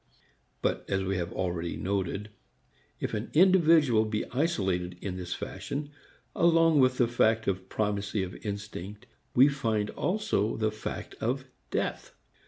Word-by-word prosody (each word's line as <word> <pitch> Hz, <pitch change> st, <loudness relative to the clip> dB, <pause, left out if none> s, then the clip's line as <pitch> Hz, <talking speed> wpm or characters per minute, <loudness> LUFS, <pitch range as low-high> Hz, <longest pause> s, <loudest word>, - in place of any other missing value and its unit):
But, -, -, 0 dB
as 95 Hz, 0 st, +1 dB
we 95 Hz, 0 st, -1 dB
have 85 Hz, -1 st, -3 dB
already 85 Hz, -2 st, -2 dB
noted, 100 Hz, +2 st, -2 dB, 0.7 s
if -, -, -3 dB
an 105 Hz, +3 st, -3 dB
individual 165 Hz, -, +5 dB
be 110 Hz, -1 st, -2 dB
isolated 95 Hz, -, 0 dB
in 95 Hz, -1 st, -4 dB
this 90 Hz, -1 st, -4 dB
fashion, 145 Hz, +1 st, -5 dB, 0.4 s
along 165 Hz, -2 st, +5 dB
with 130 Hz, -1 st, +4 dB
the 120 Hz, -, +4 dB
fact 115 Hz, -1 st, +2 dB
of 95 Hz, -1 st, -2 dB
primacy 105 Hz, -1 st, -1 dB
of 90 Hz, -1 st, -5 dB
instinct 105 Hz, -1 st, -6 dB, 0.3 s
we 130 Hz, +3 st, +8 dB
find 110 Hz, -7 st, 0 dB
also 200 Hz, -, 0 dB
the 110 Hz, -1 st, +1 dB
fact 110 Hz, -, -6 dB
of 130 Hz, +4 st, -1 dB, 0.2 s
death. -, -, -3 dB
110 Hz, 140 wpm, -29 LUFS, 95-135 Hz, 0.7 s, we